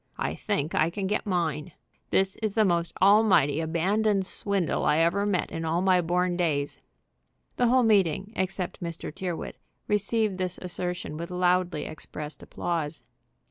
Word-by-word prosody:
"I -, -, -1 dB
think 185 Hz, -8 st, -2 dB
I 155 Hz, -, +3 dB
can 195 Hz, +3 st, -4 dB
get 210 Hz, +2 st, -1 dB
mine. 165 Hz, -3 st, -1 dB, 0.4 s
This 190 Hz, 0 st, +2 dB
is 215 Hz, -3 st, -2 dB
the 220 Hz, -1 st, +4 dB
most 170 Hz, -2 st, +1 dB
almighty 195 Hz, -8 st, +5 dB
abandoned 190 Hz, +5 st, +1 dB
swindle 195 Hz, -2 st, -1 dB
I 150 Hz, -, +3 dB
ever 170 Hz, +5 st, +2 dB
met 185 Hz, -4 st, 0 dB
in 165 Hz, -1 st, -4 dB
all 165 Hz, +3 st, 0 dB
my 185 Hz, -2 st, +4 dB
born 175 Hz, +1 st, 0 dB
days." 150 Hz, -5 st, -1 dB, 0.8 s
The 245 Hz, -, +3 dB
whole 255 Hz, +1 st, +4 dB
meeting, 200 Hz, -2 st, +2 dB
except 190 Hz, -1 st, -3 dB
Mr. 170 Hz, -3 st, -5 dB
Tyrrwhit, 175 Hz, -1 st, -5 dB, 0.3 s
received 210 Hz, -1 st, +1 dB
this 185 Hz, -1 st, -2 dB
assertion 180 Hz, -3 st, -4 dB
with 170 Hz, +2 st, -5 dB
loudly 180 Hz, -2 st, +1 dB
expressed 150 Hz, -1 st, -7 dB
applause. 160 Hz, -3 st, -3 dB
180 Hz, 150 wpm, -27 LUFS, 165-200 Hz, 0.8 s, almighty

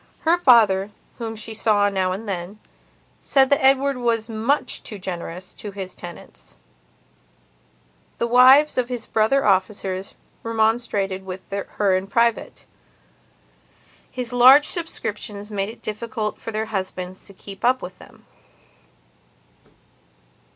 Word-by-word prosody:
Her 330 Hz, +2 st, +4 dB
father, 215 Hz, -, +4 dB, 0.3 s
whom 225 Hz, -1 st, -5 dB
she 220 Hz, +1 st, -5 dB
saw 210 Hz, -2 st, +2 dB
now 190 Hz, -2 st, 0 dB
and 205 Hz, +4 st, -5 dB
then, 190 Hz, +1 st, -5 dB, 0.6 s
said 270 Hz, 0 st, +3 dB
that 280 Hz, -, +3 dB
Edward 270 Hz, 0 st, +3 dB
was 230 Hz, -2 st, -1 dB
much 230 Hz, +6 st, -1 dB
too 210 Hz, -, -5 dB
generous 180 Hz, -1 st, -7 dB
to 210 Hz, -, -8 dB
his 190 Hz, -2 st, -7 dB
tenants; 175 Hz, -, -12 dB, 1.6 s
the -, -, 0 dB
wives 255 Hz, +4 st, +6 dB
of 245 Hz, -1 st, -1 dB
his 245 Hz, -3 st, -4 dB
brother 225 Hz, +6 st, +1 dB
officers 190 Hz, -1 st, -1 dB, 0.3 s
remonstrated 220 Hz, -4 st, -1 dB
with 185 Hz, 0 st, -8 dB
her 200 Hz, -1 st, 0 dB
in 185 Hz, +1 st, -2 dB
private; 235 Hz, +2 st, 0 dB, 1.4 s
his 250 Hz, -1 st, -6 dB
large 260 Hz, +4 st, +7 dB
subscriptions 210 Hz, -, -5 dB
made 200 Hz, 0 st, -2 dB
it 230 Hz, -, -12 dB
difficult 215 Hz, 0 st, -4 dB
for -, -, -6 dB
their 220 Hz, 0 st, -2 dB
husbands 185 Hz, -1 st, -5 dB
to 200 Hz, -, -13 dB
keep 195 Hz, 0 st, -12 dB
up 255 Hz, +2 st, +2 dB
with 180 Hz, +1 st, -9 dB
them. -, -, -17 dB
215 Hz, 125 wpm, -22 LUFS, 195-245 Hz, 1.6 s, large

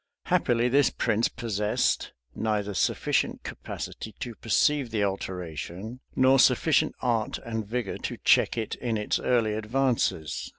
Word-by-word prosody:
Happily, 120 Hz, 0 st, +2 dB
this 135 Hz, +1 st, +4 dB
prince 115 Hz, 0 st, +1 dB
possessed 105 Hz, -2 st, -1 dB, 0.2 s
neither 105 Hz, -2 st, -1 dB
sufficient -, -, 0 dB
capacity 110 Hz, -, -7 dB
to 120 Hz, -3 st, -5 dB
perceive 130 Hz, +5 st, +1 dB
the 110 Hz, -2 st, 0 dB
alteration, 95 Hz, -, -4 dB, 0.2 s
nor 130 Hz, +1 st, +5 dB
sufficient 135 Hz, +4 st, +4 dB
art 115 Hz, -3 st, 0 dB
and 110 Hz, -2 st, -3 dB
vigor 120 Hz, -2 st, -3 dB
to -, -, -4 dB
check -, -, +4 dB
it 110 Hz, -2 st, -2 dB
in 115 Hz, -3 st, -2 dB
its 105 Hz, -, 0 dB
early 115 Hz, -4 st, +1 dB
advances. 110 Hz, -, -1 dB
110 Hz, 130 wpm, -27 LUFS, 105-125 Hz, 0.2 s, nor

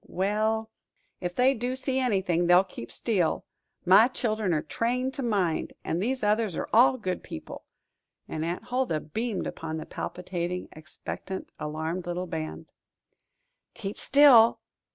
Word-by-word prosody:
"Well, 215 Hz, +3 st, 0 dB, 0.5 s
ef 180 Hz, -1 st, -3 dB
they 255 Hz, +2 st, +4 dB
do 245 Hz, +1 st, -2 dB
see 265 Hz, 0 st, -1 dB
anything, 190 Hz, -8 st, +1 dB
they'll 180 Hz, +1 st, +7 dB
keep 180 Hz, -11 st, -9 dB
still 190 Hz, -9 st, 0 dB, 0.4 s
my 195 Hz, +6 st, +7 dB
chil'en 215 Hz, -6 st, -1 dB
are 155 Hz, -2 st, +1 dB
trained 250 Hz, +3 st, -1 dB
to 275 Hz, -, -5 dB
mind; 200 Hz, -9 st, 0 dB
and 170 Hz, -, -1 dB
these 255 Hz, +3 st, -1 dB
others 210 Hz, -3 st, +1 dB
are -, -, -3 dB
all 250 Hz, +3 st, +6 dB
good 185 Hz, -6 st, -3 dB
people;" -, -, -9 dB, 0.6 s
and 155 Hz, -, -4 dB
Aunt 170 Hz, +2 st, -3 dB
Huldah 245 Hz, -11 st, -1 dB
beamed 220 Hz, +6 st, -3 dB
upon 160 Hz, -1 st, -5 dB
the 155 Hz, -, -6 dB
palpitating, 180 Hz, 0 st, -4 dB
expectant, 155 Hz, +4 st, -7 dB
alarmed 160 Hz, +4 st, -3 dB
little 175 Hz, +1 st, -2 dB
band. 160 Hz, -2 st, -6 dB, 1.0 s
"Keep 205 Hz, -3 st, -6 dB
still!" 260 Hz, -5 st, +7 dB
195 Hz, 140 wpm, -27 LUFS, 175-235 Hz, 1.0 s, they'll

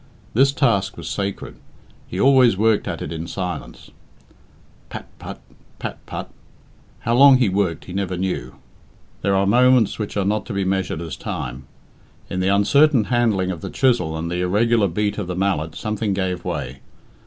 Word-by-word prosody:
This 135 Hz, +4 st, +4 dB
task 100 Hz, -9 st, +1 dB
was -, -, -7 dB
sacred. 100 Hz, -1 st, -4 dB, 0.5 s
He 90 Hz, -, -5 dB
always 130 Hz, -5 st, +5 dB
worked 110 Hz, 0 st, +2 dB
at -, -, -4 dB
it 75 Hz, -, -6 dB
in 80 Hz, +1 st, -5 dB
silence. 90 Hz, +1 st, -6 dB, 1.0 s
Pat -, -, -7 dB
put! -, -, -8 dB, 0.4 s
pat -, -, -6 dB
put! -, -, -6 dB, 0.7 s
How 115 Hz, -, 0 dB
long 135 Hz, +1 st, +8 dB
he 125 Hz, -5 st, +2 dB
worked 95 Hz, -4 st, -1 dB
he 90 Hz, -, -8 dB
never 95 Hz, -2 st, -2 dB
knew. 90 Hz, -10 st, -3 dB, 0.7 s
There 100 Hz, 0 st, +1 dB
are 95 Hz, 0 st, +2 dB
moments 125 Hz, +1 st, +4 dB
which 105 Hz, -1 st, -4 dB
are 100 Hz, -, +1 dB
not 105 Hz, +2 st, -1 dB
to 115 Hz, -, -4 dB
be 100 Hz, 0 st, 0 dB
measured 95 Hz, -3 st, -1 dB
as 85 Hz, -2 st, -5 dB
time. 65 Hz, +3 st, -6 dB, 0.6 s
In 95 Hz, -, -2 dB
the 95 Hz, -, +1 dB
uncertain 120 Hz, +7 st, +4 dB
handling 105 Hz, -6 st, +2 dB
of 85 Hz, -3 st, -6 dB
the -, -, -5 dB
chisel 120 Hz, -12 st, +1 dB
and 85 Hz, +1 st, -4 dB
the 90 Hz, 0 st, -1 dB
irregular 105 Hz, +4 st, +2 dB
beat 105 Hz, +4 st, -1 dB
of 95 Hz, -, -4 dB
the 90 Hz, -, -3 dB
mallet 90 Hz, -4 st, -1 dB
something 105 Hz, +1 st, -2 dB
gave 90 Hz, -2 st, -2 dB
way. 65 Hz, +2 st, -4 dB
100 Hz, 175 wpm, -21 LUFS, 90-115 Hz, 1.0 s, long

